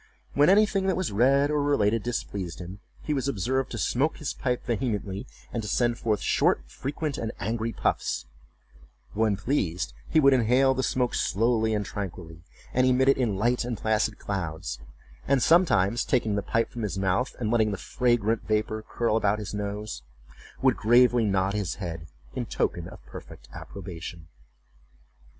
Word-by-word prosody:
When 145 +3 +5
anything 200 -1 +4
that 190 - +1
was 185 - -1
read 135 +7 +3
or 150 -1 +1
related 115 -6 +2
displeased 100 -7 -4
him, 90 +2 -8 0.2
he 150 - -1
was 135 -1 -1
observed 130 +3 -1
to 120 - -5
smoke 135 +7 0
his 150 -4 -3
pipe 125 -2 -2
vehemently, 110 -2 -2 0.3
and 115 - -1
to 105 - -5
send 120 +2 +1
forth 105 -4 0
short, - - +2
frequent 145 +1 -4
and 110 -1 -3
angry 115 +2 -2
puffs; - - -1 0.9
but 105 - -7
when 110 -3 +2
pleased, 95 - -1 0.2
he 160 - +4
would 140 -2 +6
inhale 130 +2 +4
the 130 - -1
smoke 125 -1 0
slowly 110 +1 +1
and 105 -1 -1
tranquilly, 85 -5 -6 0.3
and 130 0 +3
emit 130 +1 +4
it 135 - +4
in 110 -6 +1
light 120 +5 +1
and 120 -2 -3
placid 110 0 0
clouds; 80 -10 -4 0.5
and 135 -3 +3
sometimes, 120 - +4
taking 115 -5 +1
the 100 - 0
pipe 115 +3 0
from 120 - -6
his 105 -3 -3
mouth, 95 +6 0
and 110 -3 -2
letting 110 -2 +3
the 100 - -3
fragrant 115 -1 +1
vapor 110 0 0
curl 115 -2 0
about 105 -2 +2
his 105 -2 -6
nose, 105 - -4 0.6
would - - +4
gravely 120 +1 +4
nod 95 -1 +1
his 100 -4 -2
head 80 -4 -6 0.3
in - - -3
token 85 -1 -1
of - - -13
perfect - - -11
approbation. 85 -3 -8
110 Hz, 170 wpm, -27 LUFS, 100-130 Hz, 0.9 s, would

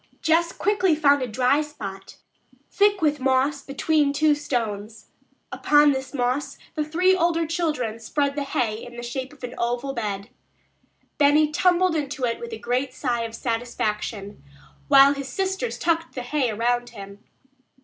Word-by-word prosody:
Jess 335 +1 +2
quickly 385 -5 +1
found 285 -2 +3
a 255 - -1
dry 255 +5 +2
spot 200 -11 -8 0.5
thick 405 -3 +2
with 295 -1 +2
moss 265 +2 +1
between 285 +1 +1
two 305 +1 +3
stones. 225 -7 -4 0.4
Upon 295 0 +4
this 265 -1 -4
moss 255 +1 -2 0.2
the 305 - -1
three 360 +5 +2
older 335 -2 +1
children 300 -9 -2
spread 280 +5 -1
the 295 - -2
hay 230 -5 -2
in 240 0 -10
the 240 - -6
shape 260 +3 -5
of 295 -3 -18
an 250 0 -5
oval 245 +3 -1
bed. 205 -4 -4 0.9
Benny 300 +1 +4
tumbled 360 +1 +2
into 280 -4 -2
it 230 -1 -2
with 235 0 -7
a 225 - -5
great 250 +3 -2
sigh 245 -4 -1
of 225 0 -7
satisfaction, 215 - -3 0.4
while 275 0 +7
his 280 -1 -6
sisters 385 - -2
tucked 330 -1 -1
the 250 - -4
hay 260 0 0
around 240 +3 0
him. 200 -2 -11
275 Hz, 160 wpm, -24 LUFS, 235-305 Hz, 0.9 s, while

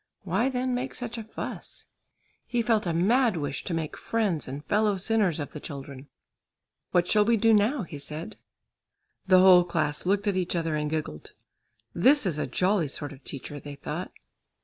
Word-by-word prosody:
Why 250 +3 +1
then 255 0 -1
make 250 +2 -3
such 240 -1 -5
a - - -5
fuss? 220 - -6 0.6
He 240 -1 0
felt 220 -4 +1
a - - +1
mad 215 +5 +3
wish 145 -2 -3
to 180 - -3
make 160 -2 -3
friends 205 -9 -1
and 140 +3 -7
fellow 210 -1 +2
sinners 195 -4 +1
of 145 - -5
the 150 - -7
children. 140 -1 -8 0.8
"What 175 0 +2
shall 210 +2 +4
we 230 +2 +3
do 225 +1 +4
now?" 215 +5 +3
he 155 -4 -8
said. 155 +8 -6 0.9
The 185 -1 +6
whole 185 -1 +8
class 160 -2 -1
looked 200 +2 +1
at 200 - +1
each 180 -1 -1
other 165 -2 -1
and 150 0 -1
giggled. 150 - -5 0.6
"This 270 +9 +4
is 165 -5 0
a - - -1
jolly 185 -3 +1
sort 145 +1 -3
of 135 0 -16
teacher," 145 +2 -7
they 145 0 -9
thought. 155 +5 -5
180 Hz, 185 wpm, -27 LUFS, 150-220 Hz, 0.9 s, whole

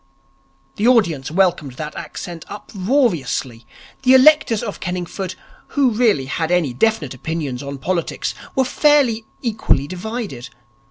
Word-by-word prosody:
The 215 - +2
audience 170 - +3
welcomed 170 -5 +1
that 150 +3 -6
accent 170 -4 -7
uproariously. 190 - -1 0.3
The 260 0 +6
electors 260 -5 +5
of 205 -4 -5
Kenningford 180 +1 -4 0.4
who 270 -3 +4
really 215 - +2
had 160 +4 -2
any 175 -7 +1
definite 160 - +1
opinions 140 -2 -4
on 140 0 -6
politics 170 +5 -2 0.2
were 265 - +3
fairly 255 -6 +3 0.2
equally 215 - +1
divided. 185 - -5
185 Hz, 120 wpm, -20 LUFS, 150-230 Hz, 0.4 s, The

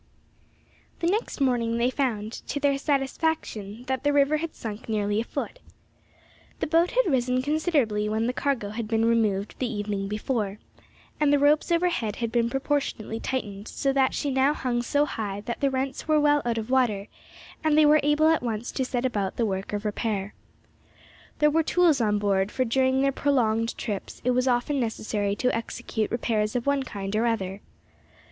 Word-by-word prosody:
THE - - -2
next 405 +2 0
morning 240 -4 +1
they 240 +2 +2
found, 225 -6 -1 0.2
to 285 - -2
their 280 -1 +2
satisfaction, 270 - -1
that 260 -1 -1
the 290 - +3
river 285 +1 +3
had 330 +1 -5
sunk 220 0 -7
nearly 205 -1 0
a - - -2
foot. - - -5 1.0
The - - 0
boat 330 +3 +3
had - - +2
risen 255 -4 +1
considerably 280 -9 +1
when 220 +1 0
the 250 - 0
cargo 255 -7 -1
had 215 +1 -4
been 225 0 +1
removed 215 -4 +1
the 250 -2 -1
evening 205 -2 -3
before, 210 -1 -2 0.6
and 300 -1 +3
the 290 - +5
ropes 295 +4 +3
overhead 335 - +1
had 230 -1 -3
been 235 -1 +2
proportionately 270 -5 -2
tightened, 210 -6 -4
so 275 -1 -1
that 265 -1 +2
she 285 - -1
now 265 +3 +3
hung 245 -4 -1
so 285 +4 +1
high 205 -7 -4
that 235 +3 -5
the 280 - +2
rents 265 +1 -3
were 310 -1 +4
well 295 0 +4
out 235 -1 0
of 225 +2 -4
water, 225 -6 +2 0.6
and 310 -1 +3
they 310 - +7
were 300 +1 +6
able 295 +2 +3
at 320 - +3
once 230 -1 -3
to 265 - -1
set 250 0 -2
about 205 -6 -1
the 235 - +1
work 190 -2 -3
of 205 +1 -3
repair. 205 -2 -2 1.0
There 300 0 +4
were 325 +2 +3
tools 325 -4 +3
on 210 -2 +2
board, 200 -1 +1
for 255 - 0
during 260 +2 +2
their 275 - +3
prolonged 230 -5 +1
trips 205 -4 -5
it 250 - +3
was 250 +1 +1
often 250 +3 +1
necessary 215 -3 -1
to 250 +3 0
execute 230 -1 -3
repairs 220 -2 -1
of 240 - -1
one 280 -1 +2
kind 200 -5 -5
or 230 +2 +2
other. 195 -3 -2
245 Hz, 185 wpm, -26 LUFS, 215-280 Hz, 1.0 s, they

